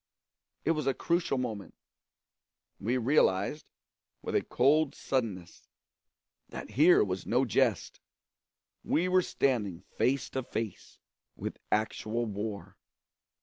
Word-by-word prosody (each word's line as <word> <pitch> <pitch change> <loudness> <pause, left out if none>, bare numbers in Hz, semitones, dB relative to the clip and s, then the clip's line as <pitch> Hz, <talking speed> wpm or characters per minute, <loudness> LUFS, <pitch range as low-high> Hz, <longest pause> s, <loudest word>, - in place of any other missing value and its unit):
It 165 - +3
was 155 -4 -1
a 135 - +2
crucial 170 -5 0
moment; 110 -6 -4 1.0
we 120 +6 0
realised, 130 +1 +2 0.6
with - - -4
a - - +3
cold 145 +4 +2
suddenness, 105 -10 -3 0.8
that - - -8
here 160 +7 +6
was 95 -2 -4
no 125 +3 +2
jest 115 - +1 0.8
we 170 +4 +1
were 185 0 +4
standing 105 - 0 0.2
face 135 0 +2
to 130 - -2
face 115 -3 -5 0.4
with - - -6
actual 110 +2 0
war. 105 -1 -5
125 Hz, 110 wpm, -30 LUFS, 105-145 Hz, 1.0 s, here